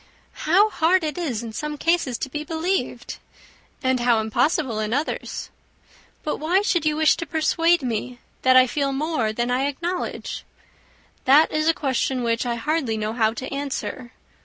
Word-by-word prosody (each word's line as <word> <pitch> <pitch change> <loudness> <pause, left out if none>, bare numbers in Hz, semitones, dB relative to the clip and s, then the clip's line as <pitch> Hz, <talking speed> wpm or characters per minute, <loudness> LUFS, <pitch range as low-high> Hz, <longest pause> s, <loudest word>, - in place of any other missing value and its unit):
"How 405 +6 +5
hard 340 +3 +3
it 305 -2 -2
is 260 -10 -3
in 225 -2 -7
some 300 +4 -4
cases 330 -7 +1
to 270 - -4
be 300 +2 -3
believed! 330 +5 -2 0.6
And 260 -1 +2
how 240 -2 +3
impossible 240 +2 0
in 215 +2 -1
others! 290 +3 -3 0.7
But 305 - -2
why 350 +6 +1
should 345 -6 +1
you 305 - +2
wish 315 0 +4
to 335 - -5
persuade 330 0 +2
me 245 +1 -3 0.2
that 255 0 +5
I 255 - +8
feel 275 +2 -1
more 275 -6 0
than 240 +3 -1
I 260 +3 +1
acknowledge?" 340 +6 -4 0.8
"That 285 +4 +6
is 310 0 0
a 330 - +3
question 260 -2 -1
which 230 +1 0
I 235 - 0
hardly 265 -2 -1
know 215 0 -2
how 225 -2 +2
to 260 +2 -6
answer. 270 -3 -4
280 Hz, 170 wpm, -23 LUFS, 240-320 Hz, 0.8 s, I